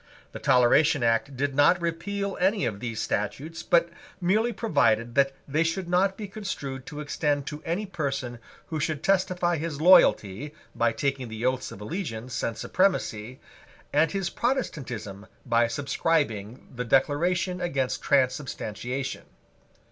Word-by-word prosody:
The - - -7
Toleration 130 +2 +4
Act 115 +4 +1
did 145 +1 0
not 145 +6 +5
repeal 200 +4 -2
any 195 +2 +2
of 100 -3 -3
these 115 -1 -4
statutes, 150 +11 -3
but 170 0 +3 0.3
merely 210 +6 +2
provided 120 - +1
that 135 +1 +3 0.2
they 150 +4 +2
should 170 +2 -2
not 190 +2 +2
be 210 - -5
construed 145 -10 -6
to 150 0 -6
extend 145 -1 -1
to 150 +1 -6
any 180 +6 -1
person 135 - -3 0.3
who 160 -2 -2
should 150 0 -2
testify 180 -3 +2
his 155 -2 -4
loyalty 150 - +4 0.2
by 120 0 +2
taking 135 0 -2
the 110 +1 -5
Oaths 130 0 0
of 100 - -10
Allegiance 125 - -4
and 115 -1 -2
Supremacy, 130 - 0 0.5
and 160 -1 +3
his 195 -3 -2
Protestantism 125 - -3 0.2
by 120 -1 +3
subscribing 125 -4 -1
the 125 0 -3
Declaration 175 +8 +1
against 135 -7 -1
Transubstantiation. 130 -1 -1
145 Hz, 140 wpm, -26 LUFS, 125-175 Hz, 0.5 s, not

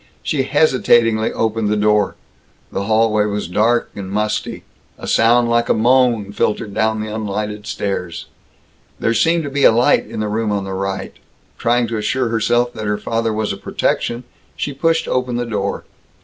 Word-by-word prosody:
She 145 - 0
hesitatingly 120 -6 +3
opened 110 -1 -1
the 105 - +1
door. 105 0 +2 0.6
The 100 - -3
hallway 110 -1 +2
was 105 -2 -2
dark 115 +6 +1
and 100 -2 -6
musty. 105 +2 -2 0.3
A - - -9
sound 120 +1 +3
like 115 0 +1
a - - +4
moan 120 -3 +2
filtered 105 0 -1
down 110 0 0
the 110 0 -5
unlighted 105 -1 -4
stairs. 90 -5 -3 0.7
There 115 - +1
seemed 165 +8 +2
to 140 - -5
be 140 +1 +5
light 115 +2 +3
in - - -6
the 105 - -1
room 110 0 -1
on 100 -1 -1
the 95 0 -5
right. 95 0 -3 0.5
Trying 120 +1 +2
to 115 - -2
assure 125 +3 0
herself 120 +2 +1
that 110 -1 -5
her 105 0 0
father 115 +1 -1
was 110 -1 -1
a - - -7
protection, 120 +1 -2 0.3
she 145 - -3
pushed 165 +3 +1
open 125 -1 -1
the 120 0 -1
door. 100 -4 -3
110 Hz, 175 wpm, -18 LUFS, 105-120 Hz, 0.7 s, be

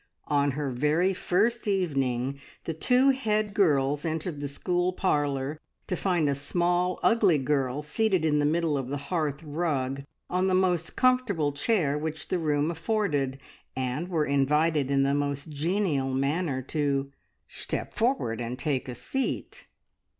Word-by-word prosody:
On 145 -2 +2
her 145 -3 -1
very 150 +9 +2
first 215 +6 0
evening 140 -9 0 0.2
the 165 - -3
two 250 - +4
head 215 -5 0
girls 145 -6 +2
entered 160 -1 -3
the 145 - -3
school 175 +5 0
parlour 145 -5 0 0.3
to 180 - -2
find 175 -5 +1
a 140 - +2
small, 175 +5 0
ugly 205 -8 +4
girl 135 0 0
seated 185 +1 +1
in 150 -1 +2
the - - +2
middle 155 -1 +1
of 130 - -4
the 140 +2 -3
hearth 150 0 -2
rug 145 -4 -1 0.3
on 185 +1 +1
the 185 - +2
most 180 -3 +1
comfortable 235 -13 +2
chair 150 -1 +1
which 160 +1 -5
the 185 - 0
room 150 0 +1
afforded, 160 -7 -1 0.4
and 130 +6 -2
were 165 -4 0
invited 145 +1 +2
in 140 -1 +3
the 140 0 +2
most 145 +1 -2
genial 150 -3 0
manner 140 0 0
to, 140 -1 -1 0.4
"Shtep - - -5
forward 225 - 0
and 120 +1 -4
take 135 -2 -2
a 125 - -5
seat!" 265 - -3
150 Hz, 150 wpm, -27 LUFS, 140-180 Hz, 0.4 s, two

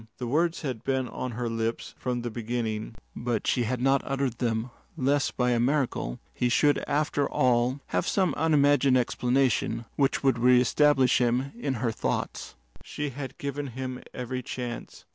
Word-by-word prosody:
The 125 - -4
words 165 +7 +1
had 130 -6 -4
been 130 -1 0
on 125 +1 -5
her 120 +1 -2
lips 115 0 -3
from 125 -1 -3
the 120 - -3
beginning, 115 -1 -3 0.2
but 120 -2 -2
she 120 -2 +1
had 125 +2 -1
not 135 +2 +3
uttered 135 -3 -2
them 115 0 -1 0.3
lest 140 0 +1
by 125 -1 +2
a 120 - +2
miracle 125 - 0 0.2
he 125 - 0
should 145 +4 +3
after 145 -1 0
all 125 +2 +2
have - - 0
some 190 -3 +2
unimagined 145 -4 +4
explanation 125 -1 +1
which 140 0 +1
would 135 -3 +3
reestablish 125 +2 +4
him 125 +2 +1
in 140 - -2
her 115 0 -1
thoughts. 110 - -3 0.3
She 150 -1 -4
had 135 +1 -7
given 140 0 -4
him 130 -1 -4
every 125 0 -4
chance. 120 -1 -6
125 Hz, 160 wpm, -27 LUFS, 120-140 Hz, 0.3 s, unimagined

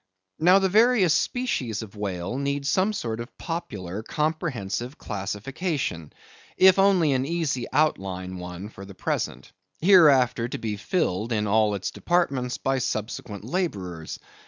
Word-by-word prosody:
Now 180 +4 +6
the 195 -1 +3
various 215 -3 +4
species 130 - -1
of 110 -1 -12
whales 100 +3 -3
need 140 0 -2
some 185 +8 +2
sort 115 - -3
of 120 +2 -8
popular 105 - -5
comprehensive 145 - -2
classification, 105 - -3 0.5
if 190 0 +6
only 190 -6 +4
an 130 -1 +1
easy 145 -5 -1
outline 95 -11 0
one 90 +3 -7
for 100 - -11
the 100 -1 -11
present, - - -3 0.3
hereafter 140 -10 +5
to - - -5
be 110 -2 -3
filled 110 - -1
in 105 -2 +1
all 105 0 +3
its 95 -1 -3
departments 140 - 0
by 135 0 0
subsequent 110 -3 -4
laborers. 100 - -3
125 Hz, 135 wpm, -25 LUFS, 100-165 Hz, 0.5 s, Now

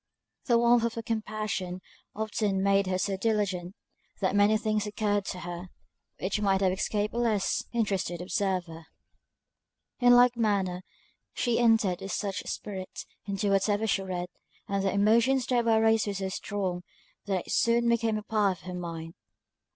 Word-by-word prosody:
The 240 -2 +4
warmth 235 0 +4
of 235 -1 -1
her 230 - -4
compassion 215 -4 -3 0.4
often 210 -2 -1
made 195 0 +3
her 185 0 0
so 195 +1 -1
diligent, 195 -4 -1 0.4
that 190 0 0
many 205 +2 +5
things 215 -1 -1
occurred 205 -1 0
to 180 -2 -5
her, 175 +1 -6 0.5
which 200 +3 -1
might 195 -1 +2
have 190 -1 +3
escaped 205 +2 -1
a 235 - -2
less 220 -5 +1
interested 200 -7 -1
observer. 180 -4 -2 1.1
In 245 0 +6
like 245 0 +6
manner, 200 -5 0 0.5
she 240 -1 +1
entered 225 -6 +3
with 195 - -5
such 200 -2 -2
spirit 190 -3 -6 0.2
into 200 0 -1
whatever 205 +2 +2
she 195 -2 +1
read, 180 -2 -4 0.4
and 200 0 -1
the 195 - +1
emotions 235 +6 +3
thereby 235 -3 +2
raised 220 -1 +3
were 200 - -2
so 190 0 -2
strong, 190 -2 -3 0.4
that 190 -3 -1
it - - -4
soon 235 0 +3
became 230 -2 +2
a 215 - -5
part 205 -4 +1
of - - -20
her 180 - -6
mind. 165 -2 -6
205 Hz, 160 wpm, -28 LUFS, 190-220 Hz, 1.1 s, In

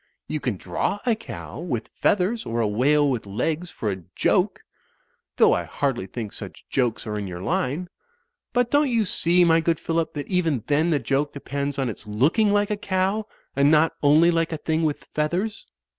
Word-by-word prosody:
You 155 - -2
can 125 -8 -2
draw 90 - -2
a 240 - +3
cow 215 -8 -8
with 135 -10 -4
feathers 205 +4 +2
or 115 +1 -3
a 115 - +2
whale 145 +8 +3
with 125 -6 -2
legs 160 - -2
for 105 -10 -3
a 95 -1 -5
joke - - +2 0.4
— - - -45
^though - - +6
I - - -2
hardly 130 -8 -2
think 110 0 -6
such - - -9
jokes 125 -4 0
are 105 -1 -3
in 100 - -4
your 90 0 -6
line. 175 - -1 0.6
But 245 -1 +1
don't 290 -1 +4
you 230 -3 +2
see, 175 -1 +3
my 165 -1 +5
good 165 -1 +1
Phillip, 165 -1 -1
that 145 - -3
even 165 - 0
then 150 +3 +2
the 155 - +3
joke 140 +1 -1
de 140 - -7
pends 140 0 -3
on 135 -2 0
its 110 -1 -7
looking 145 - +2
like 205 0 +2
a 210 - 0
cow 200 +2 0 0.3
and 140 +1 +4
not 155 +1 +4
only 155 +4 +5
like 165 -1 0
a 160 - -2
thing 160 +1 -1
with 155 -3 -1
feathers. 180 +8 -1
155 Hz, 205 wpm, -24 LUFS, 130-180 Hz, 0.6 s, ^though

